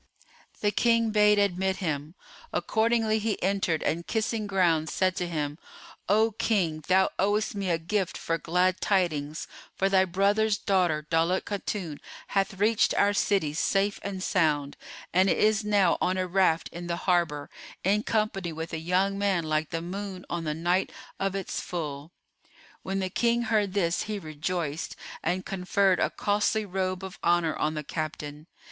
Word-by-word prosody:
The 205 - +2
King 230 +1 +2
bade 210 -1 +5
admit 190 -1 +1
him; 155 -3 -3 0.4
accordingly 220 -1 +1
he 215 0 -1
entered 190 -4 +1
and 170 +2 -1
kissing 220 -1 -1
ground[FN#433] 170 -5 +2
said 185 +2 +1
to 180 - -1
him, 150 -2 -3 0.5
"O 220 +3 +4
King, 180 -8 0
thou 190 +1 +4
owest 205 +3 +1
me 200 -2 -2
a 170 - +2
gift 185 +3 -2
for 165 0 -2
glad 180 +2 +1
tidings; 155 -6 0 0.3
for 195 - +1
thy 190 -1 +4
brother's 200 +3 +2
daughter 175 -7 +1
Daulat 165 +3 +2
Khatun 195 -6 -4 0.3
hath 195 0 0
reached 210 +3 +2
our 205 0 +3
city 195 -7 +1
safe 195 +5 +1
and 190 -2 -4
sound, 150 -7 +1 0.4
and 185 +2 +4
is 215 +2 +3
now 205 -2 +3
on 185 +1 +1
a 185 - 0
raft 180 -3 +2
in 175 0 -7
the 170 - -1
harbour, 170 -5 +1 0.3
in 205 +3 +3
company 210 -6 -1
with 160 +1 -6
a 160 - -2
young 185 +4 +1
man 195 -4 +1
like 155 -1 -1
the 165 -1 -3
moon 190 +1 -6
on 170 -1 -2
the 150 -1 -1
night 175 +3 +1 0.3
of 195 0 -1
its 195 -2 -3
full." 150 -3 -5 0.7
When 190 +1 -3
the 190 -1 -2
King 235 +2 +2
heard 210 -4 +1
this, 170 -3 +1
he 215 -1 -3
rejoiced 155 -2 -3 0.3
and 185 +1 -1
conferred 190 0 +1
a - - +2
costly 210 +1 0
robe 185 -1 -2
of 190 -1 -8
honour 170 -2 +2
on 155 +1 -1
the 150 - -3
captain. 150 0 -5
185 Hz, 165 wpm, -27 LUFS, 165-205 Hz, 0.7 s, bade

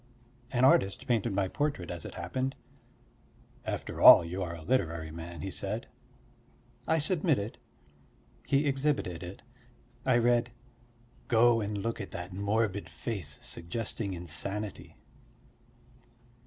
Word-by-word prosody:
An 125 +1 +3
artist 95 -7 +3
painted 115 -2 +1
my 95 -1 +1
portrait 120 - -2
as 85 - -6
it - - -7
happened: 130 +10 -2 1.1
"After - - -4
all, 85 - +10
you 90 +3 -4
are 85 -2 -3
a 80 - -10
literary 85 -9 0
man," 85 0 -8
he 95 - -4
said. 105 +5 -3 1.0
I 160 - +3
submitted, 155 - +1 0.9
he 140 +1 +3
exhibited 135 - 0
it. 90 +3 -8 0.6
I 130 -2 +4
read: 120 0 +2 0.8
"Go 115 0 +5
and 105 0 -3
look 115 +3 -3
at 100 - -6
that 90 0 -7
morbid 100 +1 0
face 95 -11 -4
suggesting 100 +3 -3
insanity." 95 +5 -4
100 Hz, 120 wpm, -30 LUFS, 90-120 Hz, 1.1 s, all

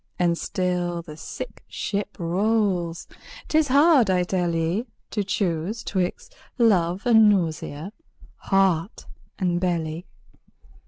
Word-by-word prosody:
And 175 -1 +2
still 175 -1 -2
the 155 -2 -10
sick 160 - -8
ship 205 0 -4
rolls. 180 -1 0 0.4
'Tis 315 -1 +3
hard, 280 - +5
I 180 -1 +3
tell 175 -2 -1
ye, 170 +9 -1 0.2
To 205 - -1
choose 190 +2 -2
'twixt 185 -2 -3 0.2
love 190 -6 +2
and 220 -3 +6
nausea, 170 -1 -1 0.4
heart 190 -1 +1 0.3
and 175 -3 0
belly. 170 -1 -2
180 Hz, 110 wpm, -24 LUFS, 170-210 Hz, 0.4 s, and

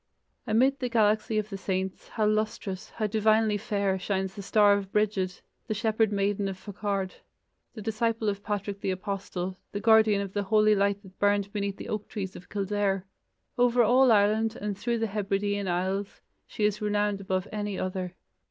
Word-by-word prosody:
Amid 265 +5 +3
the 250 - -2
galaxy 215 -1 +2
of 215 0 -2
the 195 - -5
saints, 190 -1 -3
how 215 - -1
lustrous, 215 -2 -1
how 220 - -3
divinely 215 0 +3
fair, 200 -3 -1
shines 190 0 -2
the 200 - -7
star 205 +1 +5
of 200 -1 -2
Brigid, 200 -4 0 0.3
the 215 - -1
shepherd 220 0 +1
maiden 200 0 0
of 190 -1 -4
Faughard, 200 -1 -3 0.6
the 215 - -7
disciple 225 +1 0
of 200 -1 -1
Patrick 205 -1 -3
the - - -1
Apostle, 190 -1 -4
the 205 - -2
guardian 220 -1 +5
of 200 -1 -4
the 205 - 0
holy 215 +1 +4
light 200 0 +1
that 190 -1 -16
burned 205 0 +2
beneath 200 -1 -2
the - - -7
oak 210 -1 -3
trees 190 -3 -5
of 180 - -12
Kildare! 200 -1 -1 0.5
Over 245 0 +5
all 250 +3 +5
Ireland 215 +1 +3
and 205 -1 -3
through 235 +4 -1
the 225 - 0
Hebridean 205 -1 -1
Isles, 190 +3 -2 0.3
she 210 - -1
is 210 +1 0
renowned 205 -1 0
above 185 -1 -1
any 205 -2 -3
other. 185 -1 -3
205 Hz, 180 wpm, -28 LUFS, 195-215 Hz, 0.6 s, star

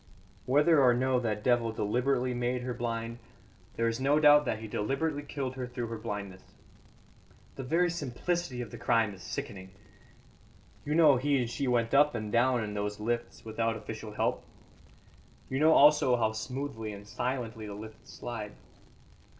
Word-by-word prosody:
"Whether 145 +3 +4
or 125 -2 +5
no 130 0 +2
that 105 -3 -2
devil 120 -2 +2
deliberately 125 +4 0
made 125 +1 -1
her 125 0 -3
blind, 115 -1 -4 0.6
there 115 - +1
is 115 +1 -1
no 140 +3 +3
doubt 150 -1 +6
that 115 - -1
he 110 0 -8
deliberately 135 +8 -1
killed 135 -3 -4
her 125 -1 -4
through 120 -2 -5
her 115 -1 -5
blindness. 100 -4 -6 1.1
The - - -7
very 165 +7 +1
simplicity 155 -2 -3
of 115 -4 -7
the - - -9
crime 115 -3 +2
is 95 - -13
sickening. 95 0 -6 1.1
You 150 - -1
know 155 -5 +6
he 140 +2 +1
and 125 -2 0
she 135 +4 -3
went 120 -2 +1
up 145 0 +5
and 110 -2 -4
down 120 0 +3
in 105 -1 -5
those 105 0 -3
lifts 120 +2 -3
without 115 +1 -1
official 110 0 -8
help; - - -1 1.1
you 130 - 0
know 160 +2 +6
also 145 -4 +6
how 110 -2 +1
smoothly 110 -1 -5
and 100 0 -11
silently 120 -1 -3
the 100 - -7
lifts 110 +1 -11
slide. 110 -4 -6
120 Hz, 165 wpm, -30 LUFS, 110-135 Hz, 1.1 s, doubt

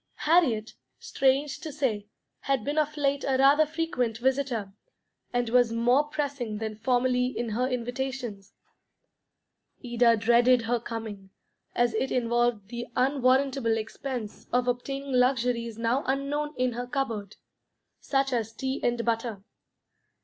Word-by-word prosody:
Harriet, 285 -10 +3 0.2
strange 275 +2 +1
to 320 -3 -6
say, 240 -8 -1 0.3
had 275 -2 0
been 290 +2 0
of 300 0 -1
late 280 -1 +1
a 265 -1 +1
rather 285 +3 +5
frequent 310 -8 -1
visitor, 250 -5 -1 0.6
and 245 -1 0
was 245 -1 +4
more 245 +5 +3
pressing 285 -7 -3
than 220 0 -4
formerly 250 +2 +1
in 240 -2 -3
her 245 +4 0
invitations. 245 -4 -4 1.3
Ida 240 -1 +3
dreaded 235 +2 +4
her 240 +1 0
coming, 220 -4 -7 0.5
as 240 -1 +2
it 265 +5 -1
involved 240 -4 +1
the 240 0 -5
unwarrantable 260 -2 +2
expense 225 0 -6
of 250 0 +1
obtaining 275 +3 -2
luxuries 245 -3 +1
now 230 +4 0
unknown 285 +3 -1
in 255 0 +1
her 245 +1 -5
cupboard, 230 -6 -3 0.6
such 270 -1 0
as 225 -2 -1
tea 265 +4 -3
and 240 -1 0
butter. 230 -3 -2
245 Hz, 130 wpm, -27 LUFS, 230-275 Hz, 1.3 s, rather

